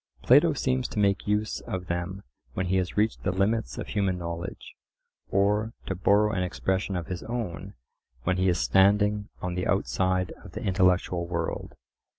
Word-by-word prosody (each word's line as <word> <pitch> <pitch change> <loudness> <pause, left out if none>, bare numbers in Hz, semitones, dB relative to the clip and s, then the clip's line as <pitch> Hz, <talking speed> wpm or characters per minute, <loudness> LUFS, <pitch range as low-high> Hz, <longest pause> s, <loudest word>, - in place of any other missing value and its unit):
Plato 150 +6 +6
seems 130 -2 0
to - - -9
make 100 -1 +2
use 105 +1 0
of 90 -1 -3
them 90 +3 -3 0.3
when 95 - -1
he 95 +1 +1
has 90 +1 -2
reached 110 +1 +1
the - - 0
limits 100 +5 0
of - - -5
human 100 -4 0
knowledge; 85 0 -6 0.6
or, 105 +3 +1
to - - -2
borrow 100 +3 +3
an 95 -4 -1
expression 95 +1 -1
of 85 -2 -2
his 90 0 -5
own, 115 - -5 0.5
when 90 +4 +1
he 95 0 +3
is 90 - +2
standing 105 +2 +3
on 90 -1 -2
the 90 +1 -2
outside 95 -1 +1
of - - -12
the - - -5
intellectual 90 -2 +2
world. 85 -1 -3
95 Hz, 170 wpm, -27 LUFS, 90-105 Hz, 0.6 s, Plato